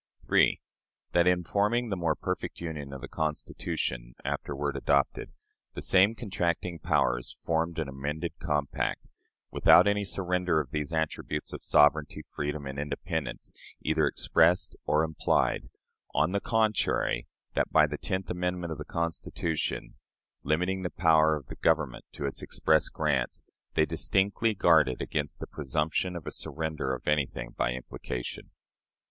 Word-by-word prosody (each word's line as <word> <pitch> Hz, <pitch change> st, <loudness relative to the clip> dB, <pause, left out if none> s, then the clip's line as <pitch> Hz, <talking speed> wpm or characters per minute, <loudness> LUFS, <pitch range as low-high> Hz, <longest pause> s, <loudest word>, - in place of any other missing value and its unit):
3. -, -, +4 dB, 0.5 s
That, 85 Hz, 0 st, +4 dB
in 90 Hz, -1 st, +3 dB
forming 105 Hz, +7 st, +1 dB
the 100 Hz, -, 0 dB
"more 85 Hz, -4 st, 0 dB
perfect -, -, -4 dB
union" 75 Hz, -5 st, -5 dB
of 70 Hz, -1 st, -7 dB
the -, -, -6 dB
Constitution, 60 Hz, -5 st, -3 dB
afterward 70 Hz, 0 st, -2 dB
adopted, 70 Hz, 0 st, +1 dB, 0.4 s
the -, -, -4 dB
same 95 Hz, +4 st, +5 dB
contracting 90 Hz, -5 st, -2 dB
powers -, -, 0 dB
formed 85 Hz, +1 st, 0 dB
an 80 Hz, -3 st, -1 dB
amended 75 Hz, +5 st, -4 dB
compact, 75 Hz, -5 st, -1 dB, 0.5 s
without -, -, +7 dB
any 100 Hz, 0 st, +2 dB
surrender 90 Hz, -3 st, 0 dB
of 70 Hz, -5 st, -4 dB
these 75 Hz, 0 st, -2 dB
attributes 80 Hz, -1 st, -2 dB
of -, -, -7 dB
sovereignty, 75 Hz, 0 st, +3 dB
freedom, 75 Hz, 0 st, -3 dB
and 70 Hz, +1 st, -5 dB
independence, 80 Hz, +2 st, -3 dB, 0.3 s
either -, -, +2 dB
expressed 85 Hz, +3 st, +3 dB
or 75 Hz, +1 st, +3 dB
implied: 80 Hz, -1 st, +1 dB, 0.5 s
on 75 Hz, +4 st, +3 dB
the 100 Hz, +1 st, 0 dB
contrary, 110 Hz, -, +1 dB, 0.3 s
that, -, -, 0 dB
by 75 Hz, -1 st, +6 dB
the 75 Hz, -1 st, -5 dB
tenth 95 Hz, -2 st, -2 dB
amendment 90 Hz, -1 st, -2 dB
to -, -, -2 dB
the -, -, -5 dB
Constitution, 85 Hz, -5 st, -2 dB, 0.4 s
limiting 90 Hz, +6 st, 0 dB
the 90 Hz, -, -2 dB
power 80 Hz, -3 st, +4 dB
of 75 Hz, -4 st, -7 dB
the -, -, -9 dB
Government -, -, +1 dB
to 70 Hz, -, -4 dB
its 70 Hz, -, -3 dB
express 80 Hz, -1 st, +2 dB
grants, 75 Hz, -5 st, 0 dB, 0.3 s
they -, -, +4 dB
distinctly 100 Hz, +3 st, +1 dB
guarded 80 Hz, -8 st, +4 dB
against 75 Hz, -2 st, -2 dB
the -, -, -4 dB
presumption 75 Hz, +6 st, -1 dB
of 85 Hz, -, -6 dB
a -, -, -4 dB
surrender 80 Hz, -5 st, -2 dB
of 60 Hz, -, -12 dB
anything 70 Hz, -5 st, 0 dB
by -, -, 0 dB
implication. 60 Hz, 0 st, -6 dB
80 Hz, 145 wpm, -29 LUFS, 75-90 Hz, 0.5 s, without